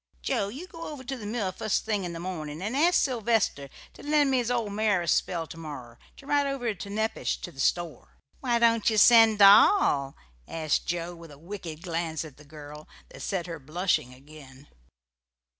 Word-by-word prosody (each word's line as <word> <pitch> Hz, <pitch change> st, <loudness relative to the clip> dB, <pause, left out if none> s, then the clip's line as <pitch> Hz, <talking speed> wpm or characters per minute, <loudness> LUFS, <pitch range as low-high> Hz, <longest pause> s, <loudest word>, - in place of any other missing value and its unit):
Joe, 195 Hz, -, 0 dB
you 270 Hz, -, -8 dB
go 330 Hz, -2 st, -9 dB
over 290 Hz, -4 st, -8 dB
to 265 Hz, +1 st, -5 dB
the 215 Hz, -5 st, -8 dB
mill 210 Hz, -4 st, -2 dB
fust 215 Hz, +3 st, -2 dB
thing 210 Hz, -4 st, -1 dB
in 175 Hz, -, -5 dB
the 165 Hz, -, -6 dB
morning 160 Hz, -4 st, -6 dB
and 210 Hz, +7 st, -3 dB
ask 335 Hz, +5 st, +3 dB
Sylvester 225 Hz, -, 0 dB, 0.2 s
to -, -, -14 dB
lend 295 Hz, -2 st, +2 dB
me 260 Hz, -, +2 dB
his 240 Hz, -1 st, -2 dB
old 230 Hz, -4 st, -1 dB
mare 205 Hz, -4 st, +1 dB
a -, -, -7 dB
spell 165 Hz, 0 st, 0 dB
to 165 Hz, -, -11 dB
morrer, 135 Hz, -7 st, -9 dB, 0.2 s
to -, -, -14 dB
ride 285 Hz, 0 st, +1 dB
over 250 Hz, -5 st, -2 dB
to 200 Hz, +1 st, -9 dB
Nepash, 220 Hz, +2 st, -2 dB
to 175 Hz, -, -7 dB
the 135 Hz, -, -16 dB
store." 170 Hz, +3 st, -2 dB, 0.2 s
"Why 240 Hz, -3 st, +1 dB
don't 230 Hz, -1 st, +3 dB
ye 220 Hz, -, -1 dB
send 225 Hz, 0 st, +7 dB
Doll?" 200 Hz, -, +5 dB, 0.3 s
asked 155 Hz, -2 st, -1 dB
Joe, 175 Hz, 0 st, -3 dB
with 165 Hz, -1 st, -13 dB
a 145 Hz, -, -13 dB
wicked 170 Hz, -1 st, -8 dB
glance 165 Hz, -3 st, -3 dB
at 150 Hz, -4 st, -13 dB
the 150 Hz, -, -16 dB
girl 150 Hz, 0 st, -11 dB, 0.2 s
that -, -, -13 dB
set 185 Hz, -4 st, -2 dB
her 165 Hz, -2 st, -7 dB
blushing 155 Hz, -2 st, -1 dB
again. 140 Hz, 0 st, -15 dB
185 Hz, 200 wpm, -27 LUFS, 155-230 Hz, 0.3 s, send